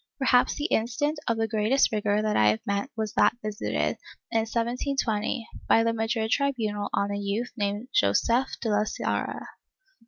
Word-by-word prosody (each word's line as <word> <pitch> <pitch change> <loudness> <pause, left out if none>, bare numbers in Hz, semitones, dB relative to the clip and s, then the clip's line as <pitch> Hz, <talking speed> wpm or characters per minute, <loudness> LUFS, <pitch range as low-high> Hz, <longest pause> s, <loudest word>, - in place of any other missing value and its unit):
^ - - -64
Perhaps 255 -2 +3
the 295 - -3
instance 290 +3 0
of 230 -2 +1
greatest 220 +5 +3
rigor 210 -1 +1
that 215 -1 0
I 105 - +4
have 110 +1 -1
met 200 +5 -1
was 215 -2 -2
that 210 +3 +3
visited, 105 - -1 0.3
in 225 - +2
1720, 235 -1 -1 0.2
by 225 - +5
the 230 0 +1
Madrid 225 0 -1
tribunal 220 -8 0
on 200 0 0
a 200 - -2
youth 205 +4 -2
named 205 +1 -2
Joseph 230 - +3
de 230 - -1
la 210 0 +2
Sarria. - - -3
220 Hz, 165 wpm, -26 LUFS, 205-245 Hz, 0.3 s, by